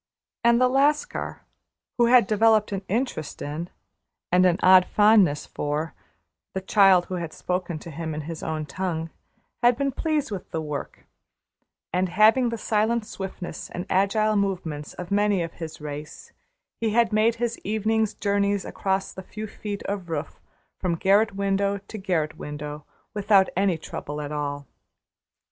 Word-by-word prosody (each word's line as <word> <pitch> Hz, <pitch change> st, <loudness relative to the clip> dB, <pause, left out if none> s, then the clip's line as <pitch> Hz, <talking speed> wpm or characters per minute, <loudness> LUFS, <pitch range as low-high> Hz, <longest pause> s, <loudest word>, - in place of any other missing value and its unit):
And 235 Hz, 0 st, +5 dB
the 255 Hz, -, +5 dB
Lascar, 290 Hz, -, +1 dB, 0.6 s
who 240 Hz, -, +5 dB
had 245 Hz, -2 st, +6 dB
developed 215 Hz, 0 st, +3 dB
an 195 Hz, -1 st, -2 dB
interest 215 Hz, -, -2 dB
in, 155 Hz, +4 st, -5 dB, 0.6 s
and 180 Hz, +1 st, +5 dB
an 175 Hz, -1 st, +2 dB
odd 185 Hz, 0 st, +7 dB
fondness 205 Hz, -8 st, +4 dB
for, 150 Hz, +2 st, -3 dB, 0.6 s
the 190 Hz, -, -1 dB
child 190 Hz, -2 st, +5 dB
who 185 Hz, -, -5 dB
had 170 Hz, -2 st, -5 dB
spoken 180 Hz, -2 st, -3 dB
to 165 Hz, +2 st, -9 dB
him 160 Hz, +1 st, -4 dB
in 155 Hz, -, -3 dB
his 160 Hz, +1 st, -7 dB
own 155 Hz, -1 st, -3 dB
tongue, 165 Hz, +1 st, -3 dB, 0.5 s
had 240 Hz, 0 st, +4 dB
been 280 Hz, 0 st, 0 dB
pleased 305 Hz, -1 st, -1 dB
with 195 Hz, -3 st, -6 dB
the 160 Hz, -, -3 dB
work; 150 Hz, -3 st, -6 dB, 0.9 s
and, 180 Hz, +1 st, +1 dB
having 220 Hz, +7 st, +5 dB
the 230 Hz, -, -3 dB
silent 220 Hz, +1 st, +1 dB
swiftness 190 Hz, -3 st, -7 dB
and 175 Hz, -, -5 dB
agile 215 Hz, +3 st, +2 dB
movements 175 Hz, -7 st, -2 dB
of 180 Hz, +1 st, -7 dB
many 205 Hz, -2 st, +2 dB
of 165 Hz, -, -6 dB
his 160 Hz, -1 st, -6 dB
race, 150 Hz, 0 st, -8 dB, 0.5 s
he 225 Hz, -, +1 dB
had 225 Hz, 0 st, +2 dB
made 220 Hz, +2 st, +3 dB
his 235 Hz, 0 st, -2 dB
evening 220 Hz, +1 st, +1 dB
journeys 200 Hz, -1 st, +1 dB
across 195 Hz, -1 st, -2 dB
the 190 Hz, -, -7 dB
few 215 Hz, +3 st, -7 dB
feet 205 Hz, -1 st, -6 dB
of 195 Hz, -3 st, -4 dB
roof 155 Hz, -1 st, -4 dB, 0.4 s
from 180 Hz, -3 st, 0 dB
garret 200 Hz, +4 st, +3 dB
window 200 Hz, 0 st, 0 dB
to 200 Hz, +2 st, -10 dB
garret 170 Hz, -6 st, -1 dB
window, 150 Hz, 0 st, -6 dB, 0.3 s
without 200 Hz, -2 st, +4 dB
any 190 Hz, -2 st, +2 dB
trouble 150 Hz, -1 st, -6 dB
at 145 Hz, -1 st, -5 dB
all. 145 Hz, -1 st, -3 dB
195 Hz, 160 wpm, -25 LUFS, 165-215 Hz, 0.9 s, odd